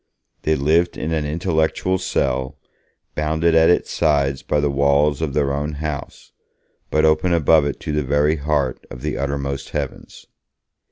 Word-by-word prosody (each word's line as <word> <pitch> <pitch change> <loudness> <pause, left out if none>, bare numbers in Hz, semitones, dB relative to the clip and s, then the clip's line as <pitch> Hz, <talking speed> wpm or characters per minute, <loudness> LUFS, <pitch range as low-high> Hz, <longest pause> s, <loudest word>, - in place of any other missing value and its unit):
They 80 - +1
lived 80 +5 +1
in 80 - -3
an 80 -2 -1
intellectual 80 +3 0
cell, 70 -6 -1 0.6
bounded 80 +2 +1
at 80 0 +5
its 90 - +2
sides 70 -4 +1
by 75 - 0
the 75 -1 +1
walls 70 +2 +2
of 75 -4 -2
their 70 -2 +1
own 75 +2 -2
house, 75 -1 -6 0.6
but 75 0 +2
open 80 +3 +2
above 75 -3 +3
to - - -5
the 75 0 0
very 75 +3 +1
heart 70 -3 -1
of 65 - -10
the - - -2
uttermost 70 0 -3
heavens. - - -7
75 Hz, 155 wpm, -20 LUFS, 70-80 Hz, 0.6 s, at